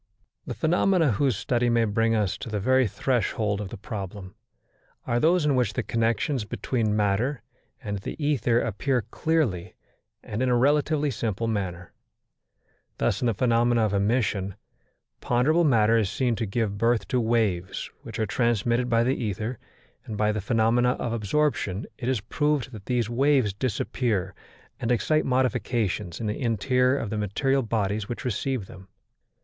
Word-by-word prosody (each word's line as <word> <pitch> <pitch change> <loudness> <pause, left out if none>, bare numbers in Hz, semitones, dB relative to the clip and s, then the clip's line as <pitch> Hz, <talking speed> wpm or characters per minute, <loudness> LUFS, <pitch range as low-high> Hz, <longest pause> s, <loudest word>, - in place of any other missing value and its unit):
The - - -4
phenomena 170 -2 +2
whose 125 0 +1
study 120 +2 0
may 115 -1 +3
bring 115 +2 +1
us 105 -4 0
to - - -6
the 105 -1 -2
very 130 +4 +3
threshold 105 -3 -1
of 100 - -5
the - - -8
problem, 95 -2 -7 0.7
are 120 - +1
those 165 +3 +3
in 145 -2 +3
which 120 -5 +1
the - - -2
connections 115 +3 0
between 110 0 -1
matter 105 +7 0 0.4
and 105 -1 -3
the - - -6
ether 130 -6 +1
appear 120 +4 -1
clearly 115 - -1 0.5
and 105 +3 -4
in 130 - +2
a 120 - +3
relatively 145 +2 +2
simple 115 -2 -2
manner. 95 -5 -3 1.1
Thus - - 0
in 125 - +1
the 115 - +1
phenomena 120 -1 +2
of 105 - -1
emission, 100 -2 0 0.6
ponderable 155 +8 +2
matter 115 -4 +4
is 105 -4 0
seen 125 +1 0
to 115 - -2
give 100 -1 -2
birth 115 0 +2
to 125 - +1
waves 110 -6 0
which 115 -6 -8
are 110 - 0
transmitted 120 +2 +1
by 115 0 +3
the 130 +3 +1
ether, 110 +3 -3 0.5
and 110 - -6
by 105 0 +2
the 105 -1 -2
phenomena 115 +4 +2
of 115 - -3
absorption 115 -3 0
it 125 -1 -2
is 130 -6 0
proved 145 +3 -1
that 105 -5 -11
these 120 -3 +1
waves 130 -3 +2
disappear 105 -3 -1 0.5
and 115 - -1
excite 155 +6 +2
modifications 115 -7 0
in 115 - -4
the 105 +4 -3
interior 125 +3 +2
of 115 -6 -4
the 110 - -2
material 135 +7 +1
bodies 105 -3 -1
which 120 - -5
receive 125 -1 -2
them. 95 0 -13
115 Hz, 165 wpm, -26 LUFS, 105-130 Hz, 1.1 s, matter